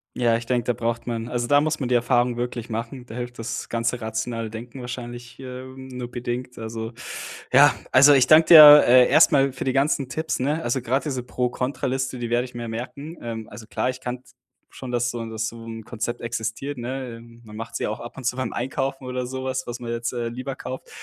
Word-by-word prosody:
Ja, 120 -2 +2
ich 115 - -3
denke, 120 -1 0
da 125 - +1
braucht 115 +1 -3
man 115 -1 -3
also, 120 -1 -1
da 145 0 +5
muss 155 0 -1
man 130 - -2
die 125 - +2
Erfahrung 120 0 +2
wirklich 120 -1 -4
machen. 115 +3 -5
Da 110 - -10
hilft 120 -1 -6
das 115 - -4
ganze 120 +1 -1
rationale 110 +1 -3
Denken 120 +4 -8
wahrscheinlich, 120 0 -8
äh, 130 -1 -7
nur 130 -2 -8
bedingt, 125 +1 -5
also 110 0 -5 0.6
ja, - - +7 0.2
also, 140 +3 +8
ich 130 -2 +5
danke 155 +2 +7
dir, 150 -3 +11
äh, 125 +1 +7
erstmal 140 -4 +5
für 125 - -5
die 130 - 0
ganzen 135 -1 +1
Tipps, 160 +5 -2
ne? 150 +5 0
Also, 120 +2 0
grad 130 +5 0
diese 130 -5 -3
Pro-Contra-Liste, 130 +1 -2
die 120 -1 -3
werde 120 +1 +2
ich 125 - -10
mir 120 -1 -5
merken. 135 +8 -6
Ähm, 115 -2 -5
also, 110 +1 -11
klar, 125 - -1
ich 130 0 -5
kannte 125 0 -6 0.4
schon 130 - -8
dass 120 0 +1
so 120 -1 -5
dass 110 0 -2
so 115 -1 -11
'n 115 -1 -7
Konzept 120 +1 -4
existiert, 115 +4 -4
ne? 125 -1 -5 0.2
Man 105 -1 -11
macht 115 - -7
sie - - -2
ja - - 0
auch 110 - -4
ab 120 - -9
und 135 - -9
zu 125 +1 -1
beim 130 - -2
Einkaufen 135 +2 -3
oder 125 0 -3
sowas, 130 0 -3
was 120 0 -6
man 120 -1 -4
jetzt, 120 +1 -3
äh, 120 -1 -2
lieber 130 +3 -5
kauft. 130 0 -7
125 Hz, 225 wpm, -24 LUFS, 115-130 Hz, 0.6 s, dir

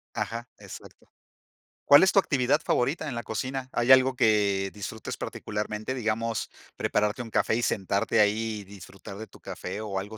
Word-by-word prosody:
Ajá. 115 +1 -4
Exacto. - - -12 0.8
¿Cuál 145 +3 +8
es 190 - +5
tu - - +5
actividad 145 -4 +1
favorita 140 +6 0
en 135 - -4
la 120 - -4
cocina? 130 +3 -4
¿Hay 120 +2 +2
algo 130 0 +6
que 100 -4 +2
disfrutes 105 +1 -6
particularmente, 105 +3 -4
digamos, 115 -1 -2 0.3
prepararte 105 +3 0
un 115 - -11
café 110 - +2
y 120 - 0
sentarte 100 +2 0
ahí, 110 +1 +1
y - - -9
disfrutar 100 0 -11
de 110 - -7
tu - - -18
café, 95 +4 -6
o 105 -3 -4
algo 105 +3 -5
110 Hz, 170 wpm, -27 LUFS, 105-125 Hz, 0.8 s, Cuál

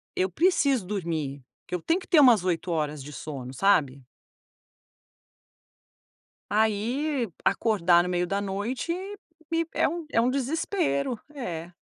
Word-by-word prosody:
eu 185 +1 +1
preciso 280 - +2
dormir 160 -8 -3 0.2
porque - - -5
eu 180 - -4
tenho 335 - +1
que - - -14
ter 330 - +5
umas 240 -9 +6
8 180 -1 -1
horas 150 -3 -2
de 150 - -9
sono, 130 -2 -7
sabe. 140 -8 +2 2.5
Aí 235 +5 0 0.2
acordar 175 -6 +3
no 180 - -3
meio 180 0 0
da 200 +2 -1
noite 205 - -3 0.6
me 330 0 +1
é - - +2
um 335 +2 -4
é - - +2
um 235 +2 +3
desespero, 280 - -1 0.2
é. 175 - -5
200 Hz, 135 wpm, -26 LUFS, 170-275 Hz, 2.5 s, umas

